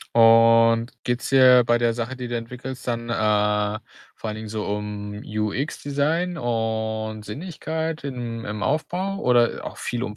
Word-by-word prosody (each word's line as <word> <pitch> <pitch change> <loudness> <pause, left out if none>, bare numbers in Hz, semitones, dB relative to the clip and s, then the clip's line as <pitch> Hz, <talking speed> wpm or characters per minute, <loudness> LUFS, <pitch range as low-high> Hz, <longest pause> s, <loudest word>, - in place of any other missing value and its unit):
Und 115 0 +6
geht's 120 0 -1
dir 130 -2 +7
bei 120 - +4
der 120 -1 +2
Sache, 120 +3 -4
die 125 -1 -5
du 120 - -2
entwickelst, 125 +2 -7
dann, 115 0 -2
äh, 105 -1 +1 0.4
vor 110 - -6
allen 105 - -4
Dingen 110 0 -7
so 105 0 -3
um 105 0 -4
UX 110 +7 -3
Design 160 +5 0
und 110 -3 -2
Sinnlichkeit 160 - -4
im 120 -4 -5
im 105 0 -4
Aufbau 185 +5 -1
oder 120 -7 +2
auch - - -7
viel 120 0 -3
um 105 -4 -4
115 Hz, 160 wpm, -23 LUFS, 110-130 Hz, 0.4 s, dir